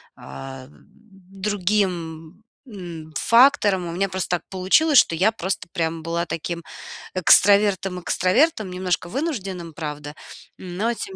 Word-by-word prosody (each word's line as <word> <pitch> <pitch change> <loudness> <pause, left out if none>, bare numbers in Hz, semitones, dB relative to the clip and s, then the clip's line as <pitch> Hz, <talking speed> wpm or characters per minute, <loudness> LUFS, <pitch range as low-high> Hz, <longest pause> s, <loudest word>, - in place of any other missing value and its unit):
ам, 130 - -10
другим, 190 -3 -4 0.3
м, 165 -5 -9
факторам. 230 -7 +4
У - - -5
меня 195 +2 -1
просто 185 0 -3
так - - -19
получилось, 215 +11 +4
что 165 - +2
я 195 +7 +3
просто 190 -4 -4
прям 160 -1 -2
была 170 +1 -2
таким 170 +1 -4 0.5
экстравертом 195 0 +4
экстравертом, 215 - +1
немножко 180 -1 -2
вынужденным, 195 - -4
правда, 150 -2 -6 0.5
но 190 +6 -2
тем 385 - -7
185 Hz, 120 wpm, -22 LUFS, 165-205 Hz, 0.5 s, факторам